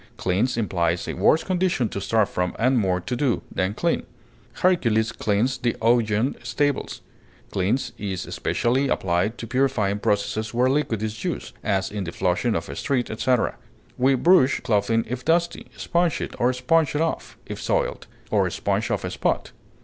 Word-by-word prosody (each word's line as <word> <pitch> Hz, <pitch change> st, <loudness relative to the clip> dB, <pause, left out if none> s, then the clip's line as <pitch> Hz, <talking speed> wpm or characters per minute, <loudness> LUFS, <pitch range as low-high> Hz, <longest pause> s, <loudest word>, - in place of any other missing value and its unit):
Cleanse 105 Hz, +8 st, 0 dB
implies 85 Hz, -6 st, 0 dB
a -, -, -2 dB
worse 150 Hz, -, +3 dB
condition 180 Hz, -, +1 dB
to 100 Hz, -, -4 dB
start 110 Hz, +1 st, +2 dB
from, 90 Hz, -2 st, -2 dB
and 130 Hz, +2 st, +3 dB
more 95 Hz, -3 st, +1 dB
to 100 Hz, +7 st, -3 dB
do, 125 Hz, -2 st, 0 dB
than 95 Hz, +3 st, -1 dB
clean. -, -, 0 dB, 0.5 s
Hercules 115 Hz, -12 st, +2 dB
cleansed 110 Hz, +5 st, 0 dB
the 120 Hz, -1 st, +1 dB
Augean 115 Hz, +1 st, +2 dB
stables. 145 Hz, +3 st, -1 dB, 0.5 s
Cleanse 100 Hz, +8 st, 0 dB
is 95 Hz, -3 st, -3 dB
especially 130 Hz, +4 st, 0 dB
applied 95 Hz, +2 st, 0 dB
to -, -, -6 dB
purifying 120 Hz, -5 st, +1 dB
processes 105 Hz, +3 st, -1 dB
where 125 Hz, +2 st, +3 dB
liquid 125 Hz, -7 st, 0 dB
is 110 Hz, 0 st, -4 dB
used, -, -, -4 dB
as 95 Hz, -2 st, 0 dB
in 100 Hz, -2 st, -3 dB
the 85 Hz, -, -4 dB
flushing 95 Hz, +6 st, 0 dB
of -, -, -2 dB
a -, -, -7 dB
street, 130 Hz, -4 st, -1 dB
etc. 125 Hz, +2 st, 0 dB, 0.4 s
We 135 Hz, +2 st, +3 dB
brush 140 Hz, -1 st, +4 dB
clothing 115 Hz, +1 st, +1 dB
if 125 Hz, +2 st, -4 dB
dusty, 170 Hz, +2 st, 0 dB
sponge 175 Hz, -2 st, 0 dB
it, -, -, -5 dB
or 120 Hz, +1 st, +3 dB
sponge 150 Hz, +4 st, +1 dB
it 150 Hz, -, +1 dB
off, 165 Hz, -, -2 dB
if -, -, -7 dB
soiled; -, -, -1 dB, 0.2 s
or -, -, +2 dB
sponge -, -, -1 dB
off -, -, -1 dB
a -, -, -3 dB
spot. -, -, -1 dB
120 Hz, 170 wpm, -24 LUFS, 100-135 Hz, 0.5 s, brush